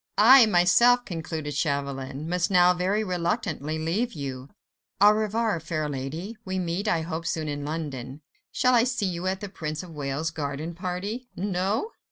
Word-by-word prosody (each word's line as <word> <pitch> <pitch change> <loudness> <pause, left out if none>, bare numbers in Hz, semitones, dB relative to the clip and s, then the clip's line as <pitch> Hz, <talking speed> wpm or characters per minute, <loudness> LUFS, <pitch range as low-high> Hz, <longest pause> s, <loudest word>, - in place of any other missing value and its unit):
"I, 240 +2 +8
myself," 225 +7 +5
concluded 160 -4 -4
Chauvelin, 140 -1 -2
"must 180 +2 0
now 180 -1 +5
very 190 +4 0
reluctantly 175 - -2
leave 185 +10 -1
you. 135 -3 -6 0.5
Au 205 +1 +8
revoir, 215 -2 0
fair 155 -1 -3
lady. 150 - -5
We 190 0 -3
meet, 180 +3 -2
I 170 -5 +2
hope, 165 0 -4
soon 155 -2 -2
in 145 -1 -3
London. 145 -3 -5 0.3
Shall 255 -1 +2
I 235 -2 +5
see 245 -4 -1
you 180 -1 -2
at 190 0 -1
the 205 - -4
Prince 155 -4 -5
of 180 - -11
Wales' 145 +2 -3
garden 150 +1 -4
party?—No? 195 - -3
175 Hz, 160 wpm, -26 LUFS, 155-205 Hz, 0.5 s, I